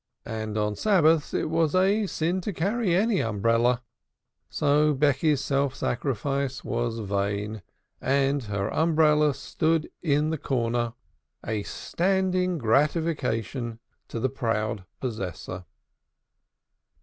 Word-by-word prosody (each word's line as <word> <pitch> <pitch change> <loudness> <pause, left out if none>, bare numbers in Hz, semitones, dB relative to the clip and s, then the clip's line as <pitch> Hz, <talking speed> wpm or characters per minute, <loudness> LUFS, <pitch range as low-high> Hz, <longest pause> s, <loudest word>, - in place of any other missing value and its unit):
And 110 -1 -4
on 105 0 0
Sabbaths 165 - +3
it - - 0
is 160 0 +1
a 200 +3 +3
sin 175 +2 -1
to 205 +3 -3
carry 195 +2 +1
any 205 +1 +2
umbrella. 115 +3 +1 0.7
So 150 0 +2
Becky's 145 +1 +2
self 135 0 0
sacrifice 135 +2 -2
was 120 -1 -2
vain, 105 0 -2 0.4
and 140 0 +1
her 100 0 -2
umbrella 150 -3 +3
stood 160 -1 0
in 150 -1 +1
the 160 - -2
corner, 120 -3 -1 0.5
a 110 -1 -1
standing 185 - 0
gratification 130 - 0 0.3
to 115 - -5
the 130 - +1
proud 110 -5 -2
possessor. 95 -6 -5
140 Hz, 110 wpm, -26 LUFS, 115-160 Hz, 0.7 s, Sabbaths